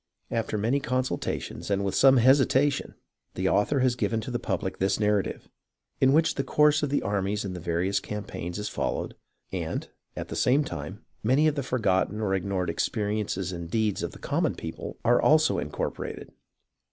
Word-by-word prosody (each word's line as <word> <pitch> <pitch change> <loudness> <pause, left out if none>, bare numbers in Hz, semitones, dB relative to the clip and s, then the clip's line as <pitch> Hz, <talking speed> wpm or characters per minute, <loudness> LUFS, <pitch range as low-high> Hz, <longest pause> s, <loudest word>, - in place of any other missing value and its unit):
After 115 -1 -1
many 115 +7 +1
consultations, 130 -4 -2
and 100 0 +1
with 95 - -1
some 135 -1 +6
hesitation, 130 +3 +3 0.4
the - - 0
author 130 +7 +2
has 130 -1 +3
given 115 -2 -1
to 120 - -6
the 120 - -1
public 95 -5 -3
this 95 +2 +1
narrative, 105 -2 0 0.5
in 130 - +5
which 160 +3 +4
the 135 - -2
course 150 +1 +3
of 150 - 0
the 145 - 0
armies 100 +1 -1
in 95 - -4
the 90 - -6
various 85 +4 0
campaigns 100 -4 -5
is 105 0 -3
followed - - -2 0.4
and, - - -3 0.3
at - - -6
the - - -5
same 135 +4 +3
time, 90 - -7 0.2
many 135 +8 +3
of 155 - +2
the 145 - -2
forgotten 105 -5 0
or 105 -3 0
ignored 95 -1 -1
experiences 105 -3 -1
and 85 -2 -6
deeds 110 0 0
of - - -2
the - - -12
common - - 0
people - - -7
are 120 +1 +4
also 155 +1 +4
incorporated. 75 - -4
110 Hz, 175 wpm, -27 LUFS, 95-130 Hz, 0.5 s, some